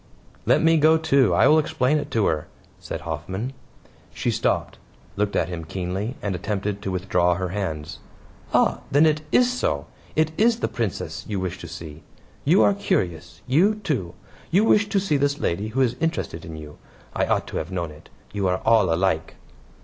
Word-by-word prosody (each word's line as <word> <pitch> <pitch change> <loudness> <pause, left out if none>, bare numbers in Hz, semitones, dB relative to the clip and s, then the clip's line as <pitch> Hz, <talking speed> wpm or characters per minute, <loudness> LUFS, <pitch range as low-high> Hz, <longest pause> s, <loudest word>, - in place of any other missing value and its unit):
"Let - - +4
me 165 0 +5
go, 160 +1 +5
too. 140 - +3
I - - +5
will 155 +1 +6
explain 155 -2 +1
it - - -6
to 110 -3 +1
her," 75 -2 0 0.3
said - - -6
Hoffman. 95 - -4 0.6
She - - -1
stopped, - - -1 0.4
looked 100 0 -1
at - - +1
him 85 -2 -5
keenly, 95 +8 -4
and 100 - -1
attempted 100 +2 -3
to 100 - -3
withdraw 90 -1 +1
her 90 0 -3
hands. 85 -6 -4 0.5
"Ah, - - +3
then 145 +3 +5
it 155 -1 +2
IS 250 0 +4
so. 75 - -1 0.3
It 155 0 +2
is 230 +1 +4
the - - 0
Princess 115 -7 -3
you 105 -3 -2
wish 95 -1 -4
to 85 - -8
see. 80 -2 -9 0.4
You 170 +8 +5
are 205 - +5
curious 95 - -2
you, 170 - +3
too; 130 - -3 0.3
you 195 +5 +4
wish 205 -2 +4
to 200 - +2
see 185 -7 +1
this 140 +1 +1
lady 100 - -1
who 125 +5 -1
is 125 -3 +2
interested 95 - -2
in 80 -1 -8
you. 75 -1 -10 0.4
I - - +1
ought - - +1
to - - -4
have 80 - -3
known 85 -4 -3
it. 75 - -15 0.2
You 100 -2 0
are 90 0 +1
all 115 -6 +4
alike." 80 -2 0
105 Hz, 190 wpm, -24 LUFS, -, 0.6 s, will